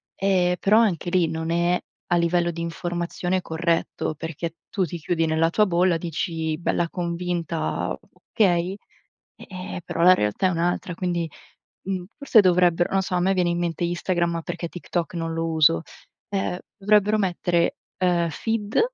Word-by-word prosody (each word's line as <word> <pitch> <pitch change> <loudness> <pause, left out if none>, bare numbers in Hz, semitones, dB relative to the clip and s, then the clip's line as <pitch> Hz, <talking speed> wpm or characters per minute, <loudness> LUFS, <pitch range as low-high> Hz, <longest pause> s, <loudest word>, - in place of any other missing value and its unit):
ehm, 180 -2 +2
però 210 +2 +4
anche 195 -6 +2
lì 175 -2 +3
non 160 0 -3
è, 175 +1 +2 0.3
a 175 - +2
livello 170 0 +2
di 170 0 -6
informazione, 175 +2 -2
corretto, 165 -1 -1
perché 165 +1 -5
tu 190 -3 0
ti 170 +1 -6
chiudi 165 +2 0
nella 160 +1 +2
tua 210 +5 +3
bolla, 175 -2 +2
dici 160 -1 -3
bella 170 0 0
convinta: 170 -1 -2 0.3
"Okay", 185 -3 +2 0.6
e - - -13
ehm, 185 -1 -6
però - - -2
la 180 +2 +8
realtà 105 - 0
è - - +1
un'altra 175 +1 -1
quindi, 175 -2 -2 0.6
mhmm, 185 -2 -2 0.2
forse 270 -6 +6
dovrebbero 175 -2 +3
non 195 - +3
so, 185 -1 -3
a - - +2
me 190 +2 +2
viene 180 -2 +1
in 170 - 0
mente 170 -1 -2
Instagram, 170 -1 -1
perché 170 0 -4
TikTok 175 0 -4
non 165 -1 -2
lo 165 0 -1
uso, 155 - +4 0.5
ehm, 195 -3 -2 0.2
dovrebbero 210 +1 +3
mettere, 175 -3 +1 0.2
ehm, 175 -2 +2
feed, 215 +5 -1
175 Hz, 160 wpm, -24 LUFS, 165-185 Hz, 0.6 s, la